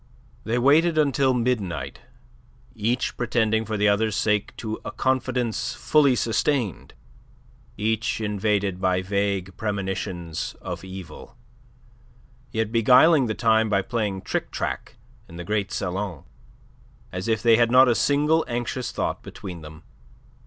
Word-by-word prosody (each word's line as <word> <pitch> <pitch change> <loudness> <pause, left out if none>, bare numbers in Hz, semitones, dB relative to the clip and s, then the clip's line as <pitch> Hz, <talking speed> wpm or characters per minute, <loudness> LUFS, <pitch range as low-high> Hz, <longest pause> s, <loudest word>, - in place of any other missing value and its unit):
They 115 +3 0
waited 155 +6 +4
until 140 -3 +3
midnight, 100 - -2 0.7
each 115 +2 -1
pretending 110 -2 +1
for 110 0 -3
the 105 +1 +3
other's 105 +1 +2
sake 105 0 0
to 110 -1 -5
a - - -5
confidence 130 -2 -1
fully 145 -4 +3
sustained, 115 - -1 0.8
each 110 +2 -1
invaded 100 -3 -1
by 95 -1 +1
vague 100 -1 -1
premonitions 95 -5 -3
of - - -6
evil, 95 +4 -10 1.1
yet 110 -3 -1
beguiling 125 +5 +5
the 110 - -2
time 110 -1 +2
by 100 -2 +1
playing 105 -4 -2
tric - - -2
trac - - -4 0.3
in 85 - -11
the 90 - -6
great 105 +1 -2
salon, 95 -4 -3 0.9
as 90 +3 -5
if 110 -2 0
they 115 -2 +6
had 120 -1 +3
not 130 +2 +7
a 120 - +4
single 150 +6 +2
anxious 120 +1 -3
thought - - -2
between 90 -3 -9
them. 75 +1 -12
110 Hz, 130 wpm, -24 LUFS, 95-120 Hz, 1.1 s, not